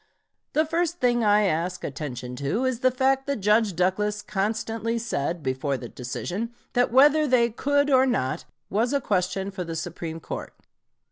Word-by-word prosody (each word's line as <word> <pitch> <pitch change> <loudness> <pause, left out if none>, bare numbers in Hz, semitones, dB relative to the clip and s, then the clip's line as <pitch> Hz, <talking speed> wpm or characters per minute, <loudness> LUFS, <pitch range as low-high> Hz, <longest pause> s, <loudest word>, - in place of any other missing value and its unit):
The 310 +1 +3
first 340 +2 -1
thing 240 -1 +2
I 210 0 +4
ask 180 0 -1
attention 125 -4 -5
to 145 - -1
is 255 -3 0
the 255 0 +4
fact 265 +2 +1
that 280 - 0
Judge 210 -2 +2
Douglas 205 +4 0
constantly 220 +3 -2
said, 175 -8 -2
before 135 +1 -1
the 120 -2 -8
decision, 180 - -4 0.2
that 245 -1 +2
whether 295 +4 +5
they 240 -3 +3
could 285 +4 +1
or 260 0 +5
not, 130 - -1 0.2
was 230 +6 0
a 280 - +3
question 195 -3 -1
for 190 -2 -4
the 165 -1 -5
Supreme 165 0 -5
Court. - - -7
210 Hz, 165 wpm, -25 LUFS, 170-255 Hz, 0.2 s, whether